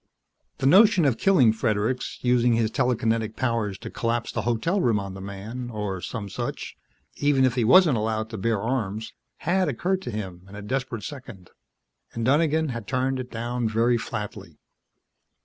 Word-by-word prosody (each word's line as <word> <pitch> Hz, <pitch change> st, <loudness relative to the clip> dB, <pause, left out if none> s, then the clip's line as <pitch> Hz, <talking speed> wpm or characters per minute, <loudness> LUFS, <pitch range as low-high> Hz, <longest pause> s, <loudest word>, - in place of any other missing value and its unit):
The 135 Hz, -, -3 dB
notion 190 Hz, +2 st, +6 dB
of 125 Hz, -5 st, +1 dB
killing 135 Hz, -, +5 dB
Fredericks 110 Hz, +3 st, -1 dB
using 125 Hz, -1 st, +3 dB
his 115 Hz, -1 st, +1 dB
telekinetic 115 Hz, -3 st, 0 dB
powers 115 Hz, -6 st, -1 dB
to -, -, -8 dB
collapse 115 Hz, 0 st, -1 dB
the -, -, -2 dB
hotel 120 Hz, -, 0 dB
room 115 Hz, -7 st, +2 dB
on 100 Hz, -1 st, -6 dB
the 95 Hz, -, -8 dB
man, 105 Hz, +6 st, -6 dB
or 105 Hz, -5 st, -4 dB
some 110 Hz, -1 st, -5 dB
such, 95 Hz, -, -5 dB, 0.4 s
even 145 Hz, -2 st, +3 dB
if 130 Hz, -, +2 dB
he 125 Hz, -1 st, 0 dB
wasn't 150 Hz, +2 st, +6 dB
allowed 110 Hz, 0 st, -2 dB
to 110 Hz, -, -5 dB
bear 110 Hz, +1 st, 0 dB
arms 110 Hz, -2 st, -3 dB, 0.3 s
had 180 Hz, 0 st, +2 dB
occurred 185 Hz, +9 st, -1 dB
to 125 Hz, -, -6 dB
him 95 Hz, -5 st, -6 dB
in 100 Hz, -, -11 dB
a 105 Hz, -, -8 dB
desperate 125 Hz, -2 st, -3 dB
second, 105 Hz, -10 st, -9 dB, 0.6 s
and 115 Hz, -1 st, -3 dB
Donegan 155 Hz, +3 st, +2 dB
had 115 Hz, -5 st, -5 dB
turned 130 Hz, +1 st, 0 dB
it 125 Hz, -1 st, -6 dB
down 120 Hz, 0 st, -2 dB
very 115 Hz, +2 st, +2 dB
flatly. 105 Hz, -2 st, -6 dB
115 Hz, 170 wpm, -25 LUFS, 110-130 Hz, 0.6 s, notion